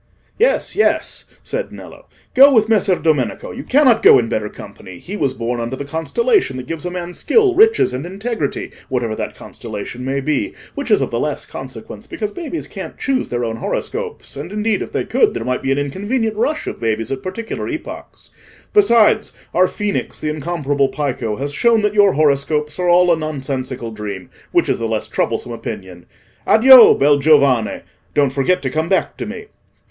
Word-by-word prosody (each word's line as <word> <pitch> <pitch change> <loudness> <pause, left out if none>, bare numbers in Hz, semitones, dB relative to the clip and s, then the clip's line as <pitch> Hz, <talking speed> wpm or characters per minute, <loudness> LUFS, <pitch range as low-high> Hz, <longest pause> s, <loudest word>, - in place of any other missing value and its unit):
"Yes, - - +1
yes," 430 - 0 0.2
said - - -4
Nello, - - -12 0.3
"go 275 +2 +8
with 220 -4 +4
Messer 210 -4 +3
Domenico, 150 -9 -1
you 265 - -7
cannot 255 -5 +4
go - - +8
in 115 -3 0
better 105 -1 -2
company; 95 -3 -11
he 190 - -8
was 135 -9 -1
born 120 +1 -3
under 120 +2 -3
the 140 - -6
constellation 360 - 0
that 130 - -6
gives 165 +4 -5
a - - -2
man 180 0 -6
skill, 410 - +2
riches, 435 - +4
and 130 +2 -4
integrity, 195 - -4 0.2
whatever 120 -4 -1
that - - -5
constellation 115 +2 -8
may 135 +1 -1
be, 155 - -2 0.2
which - - -5
is - - +4
of - - -4
the - - -1
less - - -3
consequence - - -9
because 210 -2 -4
babies 335 +2 -5
can't - - -8
choose 270 -2 -1
their 120 0 -2
own 115 0 -4
horoscopes, - - -4
and, 145 +6 -7
indeed, 210 0 0
if - - -6
they - - -2
could, 430 -2 +2
there - - -4
might 125 0 -1
be 135 - -1
an 135 - +1
inconvenient 205 - -2
rush 295 +8 -1
of - - -6
babies 115 0 -2
at 135 -1 -3
particular 225 - -5
epochs. - - -8 0.4
Besides, 235 - +4 0.2
our 185 +1 +4
Phoenix, 210 +1 -3
the 155 - -2
incomparable 145 -3 -1
Pico, 130 -7 -3
has 140 +4 -4
shown 225 +6 +3
that 210 0 +1
your 205 -2 +5
horoscopes 150 +1 0
are 180 -1 +1
all 175 0 +5
a - - +5
nonsensical 135 -6 -4
dream—which 105 -3 -3
is - - 0
the 115 - -2
less 110 -1 -2
troublesome 120 - -2
opinion. 95 -6 -8 0.4
Addio! 255 +1 +8
bel 145 +1 +4
giovane! 140 -6 +3 0.3
don't 140 -2 +2
forget 140 +4 +1
to 130 - -2
come 160 +3 -1
back 190 - 0
to - - -5
me." 435 - -7
155 Hz, 185 wpm, -18 LUFS, -, 0.4 s, go